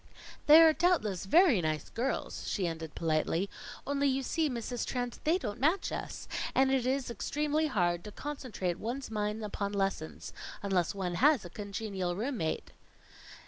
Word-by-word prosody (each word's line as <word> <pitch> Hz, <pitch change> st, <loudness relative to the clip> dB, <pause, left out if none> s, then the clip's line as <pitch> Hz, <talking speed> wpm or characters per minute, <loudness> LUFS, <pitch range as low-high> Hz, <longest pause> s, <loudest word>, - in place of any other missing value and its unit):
"They 310 Hz, +2 st, +10 dB
are 320 Hz, -1 st, +7 dB
doubtless 300 Hz, -, +1 dB
very 320 Hz, -, +5 dB
nice 155 Hz, -2 st, -1 dB
girls," 245 Hz, +4 st, -2 dB
she 195 Hz, -, 0 dB
ended 160 Hz, -2 st, -4 dB
politely, 165 Hz, +3 st, 0 dB, 0.3 s
"only, 280 Hz, 0 st, +1 dB
you 270 Hz, 0 st, +1 dB
see, 315 Hz, +3 st, 0 dB
Mrs. 245 Hz, -1 st, -3 dB
Trent, 245 Hz, -2 st, -3 dB
they 325 Hz, +4 st, +4 dB
don't 220 Hz, -, -5 dB
match 320 Hz, +9 st, +2 dB
us; -, -, -5 dB, 0.3 s
and 265 Hz, 0 st, +4 dB
it 260 Hz, -2 st, +1 dB
is 265 Hz, -1 st, 0 dB
extremely 300 Hz, +7 st, 0 dB
hard 175 Hz, -, +1 dB
to 210 Hz, -, -7 dB
concentrate 240 Hz, -11 st, -4 dB
one's 245 Hz, +2 st, -4 dB
mind 210 Hz, 0 st, -2 dB
upon 200 Hz, -1 st, -3 dB
lessons, 195 Hz, -5 st, -2 dB, 0.3 s
unless 190 Hz, -2 st, +1 dB
one 185 Hz, -3 st, -2 dB
has 290 Hz, -7 st, +5 dB
a 175 Hz, -, -9 dB
congenial 200 Hz, -3 st, -3 dB
room 245 Hz, +6 st, -2 dB
mate." 160 Hz, -5 st, -2 dB
225 Hz, 160 wpm, -31 LUFS, 190-275 Hz, 0.3 s, They